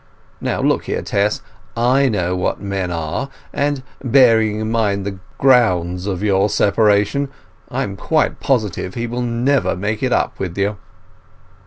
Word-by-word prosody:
Now - - -1
look - - +1
here, - - -2
Tess, 100 +1 0 0.3
I 130 +3 +3
know 90 -4 0
what 90 - -1
men 100 -2 -3
are, 85 - -3 0.2
and, 140 -2 -1 0.2
bearing 115 -5 +4
in 110 0 -2
mind 100 -4 0
the 100 -1 -5 0.2
grounds 90 -9 +3
of 95 -1 -2
your 100 0 +2
separation, 105 +7 +2 0.4
I - - -1
am 100 -1 -5
quite 155 - 0
positive 105 -8 -1
he 120 - -2
will 120 +1 -3
never 120 +4 +1
make 105 +3 -2
it 130 - 0
up - - 0
with 90 -2 -4
you. 100 +1 0
105 Hz, 155 wpm, -19 LUFS, 95-125 Hz, 0.4 s, bearing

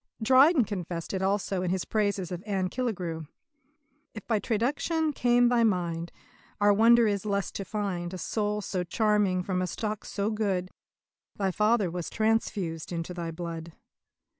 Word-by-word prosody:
Dryden 265 +5 +6
confessed 175 -5 -5
it 190 - -1
also 195 -1 0
in 180 - -1
his 185 0 -1
praises 200 -4 -1
of 175 -1 -4
Anne 190 -3 0
Killigrew: 180 - -3 0.9
"If 215 - -8
by 220 -3 +1
traduction 290 - 0
came 245 -1 +4
thy 240 -1 +3
mind, 170 -5 0 0.5
Our 205 0 +5
wonder 230 +3 +6
is 205 -2 +1
the 215 - -5
less 200 -1 -1
to 195 - -5
find 190 -4 -3
A 185 - -5
soul 210 +3 -1
so 185 -2 -2
charming 205 -1 +1
from 185 0 -1
a 185 - -1
stock 215 +2 -4
so 205 +2 -2
good. 195 -4 -1 0.6
Thy 195 -2 0
father 210 -2 +2
was 175 -1 -4
transfused 205 -7 -1
into 170 +1 -4
thy 170 -2 -4
blood." 165 0 -6
200 Hz, 165 wpm, -28 LUFS, 180-220 Hz, 0.9 s, Dryden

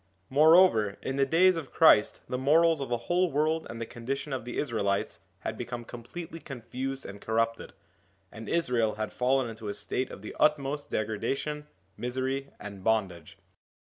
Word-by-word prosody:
More 155 +4 +7
over, 110 - +4
in 135 - -3
the 135 0 +3
days 185 +4 +5
of 160 -5 -6
Christ 130 -10 +5
the 125 - -3
morals 160 +3 +4
of 135 - -4
the 120 -1 -2
whole 180 0 +2
world 155 +3 0
and 115 - -7
the 115 - -3
condition 135 +5 -5
of 130 -3 -4
the 120 - -5
Israelites 105 -7 -1 0.2
had - - -4
become 120 -1 -5
completely 160 +9 -8
confused 135 0 -6
and 100 +1 -9
corrupted, 115 +1 -1 0.6
and 110 +1 -9
Israel 125 -10 +1
had 110 0 -4
fallen 130 0 +1
into 110 -2 -7
a 100 - -3
state 130 - -2
of 100 - -10
the - - -8
utmost 145 -1 +1
degradation, 135 +8 -2 0.3
misery, 130 +2 -2
and 100 -2 -9
bondage. 95 -7 -1
130 Hz, 170 wpm, -29 LUFS, 110-150 Hz, 0.6 s, More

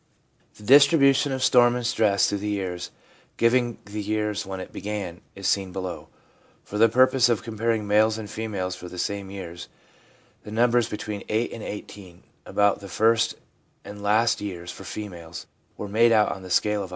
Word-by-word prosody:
The 105 - -15
distribution 140 +2 +5
of 130 -1 -2
storm 120 -1 +5
and 125 -1 -3
stress 105 -4 +2
through 100 - -2
the 105 +1 -3
years, 90 -3 -3 0.5
giving 120 0 +2
the 105 +1 -5
years 105 0 -2
when 95 -1 -5
it 95 - -9
began, 100 -5 -5
is 100 - -4
seen 95 -2 0
below. 95 -1 -6 0.6
For 105 - -5
the 115 +1 +6
purpose 130 +1 +4
of 115 - 0
comparing 115 -1 -1
males 110 +2 +3
and 110 -2 -6
females 100 -5 -4
for 90 - -9
the 90 - -10
same 100 +1 -3
years, 85 -3 -8 0.7
the - - -11
numbers 120 +1 +2
between 105 -1 -5
8 110 +2 0
and 115 - -7
18 100 -4 -9
— - - -40
about 100 -1 +2
the 100 -1 -10
first 110 +4 +2 0.5
and 105 0 -9
last 110 +3 +2
years 90 -4 -6
for - - -11
females 85 -6 -8 0.2
— - - -40
were 105 - -5
made 115 +3 +4
out 110 -2 +4
on 95 - -6
the 95 - -10
scale 105 +3 +1
of 95 - -5
100. - - -18
105 Hz, 190 wpm, -25 LUFS, 95-115 Hz, 0.7 s, the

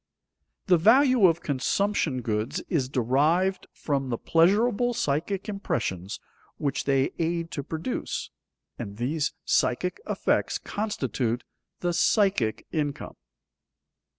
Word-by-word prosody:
_The 180 -3 +5
value 250 - +6
of 170 0 +1
consumption 145 -1 0
goods 110 0 -1
is 135 -7 0
derived 150 +10 +1
from 135 -3 -2
the 120 - -1
pleasurable 215 - +3
psychic 170 +7 -1
impressions 110 - -3 0.4
which 140 -1 -2
they 135 -1 +2
aid 170 0 -1
to 145 - -3
produce, 160 - -4 0.5
and 100 0 -6
these 145 +6 -1
psychic 180 - +1
effects - - +1
constitute 130 - -2 0.4
the 175 -1 0
psychic 190 - +2
income. 145 -3 -3
160 Hz, 105 wpm, -26 LUFS, 130-195 Hz, 0.5 s, value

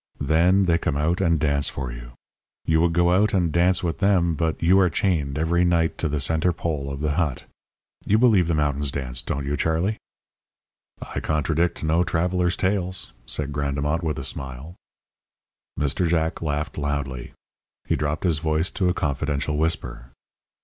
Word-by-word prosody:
Then 85 +7 +3
they 85 -2 +2
come 75 -3 -1
out 85 +6 0
and 85 -4 +2
dance 70 -1 +1
for 65 -3 -5
you. - - -10 0.5
You 80 0 +2
would 85 0 +3
go 85 +1 +3
out 100 +3 +3
and 85 -4 +1
dance 90 +3 +2
with 80 -5 -2
them 90 -4 +3
but 80 +1 -1
you 90 +4 +4
are 90 -2 +4
chained 75 -5 0
every 85 +3 +1
night 85 -2 +1
to 80 - -1
the 75 0 -1
centre 80 +5 +1
pole 75 -5 -3
of 70 +1 -6
the 75 -1 0
hut. 75 -4 -1 0.6
You 105 - +4
believe 110 -8 +4
the 85 - +1
mountains 75 -1 0
dance, 65 -2 -4
don't 70 +2 -3
you, 70 +1 -1
Charlie?" 80 +8 0 1.2
"I - - -1
contradict 80 +3 0
no 80 +3 +2
traveller's 90 +1 0
tales," 95 -1 -2 0.2
said 70 +3 -2
Grandemont, 70 +3 -1
with 80 -3 -2
a 70 - -4
smile. 65 +3 -3 1.1
Mr. 75 +5 +1
Jack 80 -1 0
laughed 75 -1 -3
loudly. 70 -4 -3 0.5
He - - +1
dropped 75 +1 -2
his 85 -5 +2
voice 80 +3 0
to 90 -2 0
a 90 - 0
confidential 75 +1 -1
whisper. 80 -5 -2
80 Hz, 170 wpm, -23 LUFS, 70-85 Hz, 1.2 s, you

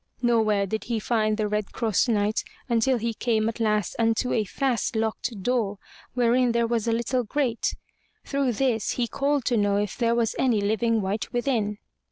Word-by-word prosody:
Nowhere 220 -4 +3
did 220 +3 -4
he 230 -2 -1
find 215 -1 +1
the 215 -1 0
Red 210 0 -2
Cross 225 0 +1
Knight 210 -2 +1 0.2
until 245 +2 +2
he 230 0 -2
came 220 -1 0
at 225 +1 -3
last 210 -3 0
unto 225 +2 +1
a 220 -2 +1
fast 245 +3 -1
locked 220 -1 -2
door, 225 -4 0 0.4
wherein 245 0 +3
there 235 0 +2
was 230 -1 -1
a - - +2
little 235 +2 0
grate. 240 0 -1 0.5
Through 275 -3 0
this, 235 -2 0
he 240 -1 -1
called 280 0 0
to 245 - +2
know 205 -1 +2
if 205 0 -1
there 235 -1 +1
was 230 -2 0
any 245 -5 +3
living 220 +2 +1
wight 200 +3 -2
within. 240 -5 0
230 Hz, 185 wpm, -25 LUFS, 215-240 Hz, 0.5 s, Nowhere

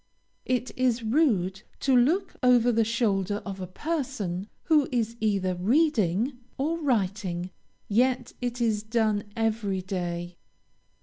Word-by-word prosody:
It 255 -1 0
is 250 -2 +1
rude 215 - +1 0.2
to 270 -2 +3
look 330 +11 +3
over 245 -2 +5
the 225 -1 +3
shoulder 210 -4 0
of 195 -1 -6
a 185 - -4
person 210 - -3 0.2
who 305 -4 +3
is 230 -2 0
either 195 -4 +1
reading 230 - +1 0.2
or 320 +5 -1
writing, 195 - -1 0.4
yet 245 +3 +1
it 245 0 -2
is 220 -3 +1
done 215 -2 0
every 215 -4 0
day. 175 -2 -4
225 Hz, 125 wpm, -27 LUFS, 195-255 Hz, 0.4 s, over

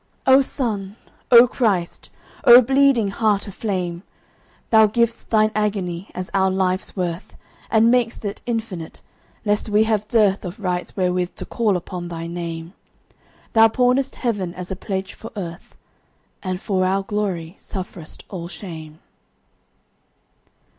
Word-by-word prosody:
O 265 +1 +7
Sun, 215 -8 -2 0.3
O 240 0 +9
Christ, 205 -9 -1 0.3
O 245 0 +9
bleeding 270 -4 +3
Heart 205 -1 +1
of 200 - -8
flame! 180 -5 -3 0.7
Thou 220 -1 +7
giv'st 235 +2 0
Thine 215 -1 +3
agony 195 -4 -2
as 185 0 -5
our 190 -1 +3
life's 185 0 -1
worth, 175 -2 -4 0.3
And 225 +1 +4
mak'st 240 -3 0
it 205 +1 -4
infinite, 220 -9 -4 0.4
lest 210 +1 0
we 210 +1 +4
have 215 -2 0
dearthOf 200 -5 +1
rights 180 -2 -3
wherewith 180 -1 0
to - - -7
call 215 -5 +1
upon 175 0 -6
thy 165 -1 -6
Name; 170 0 -6 0.8
Thou 225 0 +7
pawnest 250 +4 +1
Heaven 200 -8 -2
as 180 0 -7
a - - -2
pledge 190 +1 -4
for 225 - -10
Earth, 175 -3 -7 0.7
And 185 -2 -3
for 190 -2 0
our 190 +1 +1
glory 195 -5 -3
sufferest 185 -4 -7
all 175 -3 -6
shame. 160 -3 -9
195 Hz, 135 wpm, -21 LUFS, 180-225 Hz, 0.8 s, O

